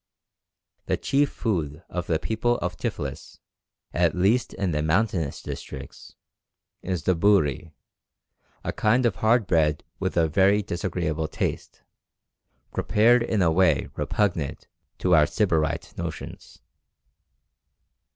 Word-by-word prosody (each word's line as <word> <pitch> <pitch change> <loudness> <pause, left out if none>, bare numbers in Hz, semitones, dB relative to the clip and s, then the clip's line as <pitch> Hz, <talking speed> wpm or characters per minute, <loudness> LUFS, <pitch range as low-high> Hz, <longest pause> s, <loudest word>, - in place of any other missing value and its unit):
The - - +1
chief 140 +1 +1
food 80 - -3
of 90 -1 -4
the 80 - +2
people 115 +7 0
of 90 0 -3
Tiflis, - - -5 0.6
at 85 -1 +2
least 100 +7 +2
in 95 -2 -1
the 75 -1 0
mountainous 85 -2 0
districts, 65 0 -8 0.7
is 90 -5 -3
the 95 - +3
bhouri, 85 -4 +2 0.9
a - - -3
kind 120 +4 +2
of 105 -7 +1
hard 110 +3 +3
bread 75 -4 +1 0.2
with - - -2
a 80 -1 +4
very 100 +5 +3
disagreeable 85 -4 -2
taste, - - -4 0.9
prepared 115 +3 +4
in 110 -4 +1
a 80 - +3
way 80 -6 +2
repugnant 85 -9 -1 0.3
to 90 - +1
our 75 -2 +6
sybarite 80 -8 0
notions. - - -7
90 Hz, 120 wpm, -25 LUFS, 80-105 Hz, 0.9 s, our